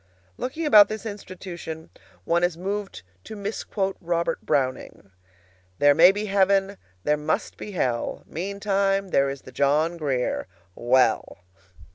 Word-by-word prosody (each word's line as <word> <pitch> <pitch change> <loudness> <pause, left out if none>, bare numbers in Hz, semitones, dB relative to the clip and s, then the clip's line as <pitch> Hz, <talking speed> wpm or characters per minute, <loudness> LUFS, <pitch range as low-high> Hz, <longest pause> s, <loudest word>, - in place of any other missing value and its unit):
Looking 310 - -4
about 210 -8 +7
this 215 +1 -6
institution, 185 -6 -8 0.3
one 170 +1 +2
is 175 -2 +1
moved 195 - -4 0.2
to - - -8
misquote 200 -1 -3
Robert 170 -1 -1
Browning. 130 -7 -2 0.7
"There 145 0 +5
may 170 +5 +7
be 205 +2 -3
heaven; 195 0 +2 0.3
there 150 0 +2
must 150 - -2
be 210 - -8
hell; 125 -9 -2
Meantime, 195 +2 -1
there 140 -5 +2
is 135 0 -7
the - - -12
John 150 +6 +1
Grier 135 - -1 0.3
well!" 120 -4 +1
180 Hz, 130 wpm, -24 LUFS, 145-200 Hz, 0.7 s, about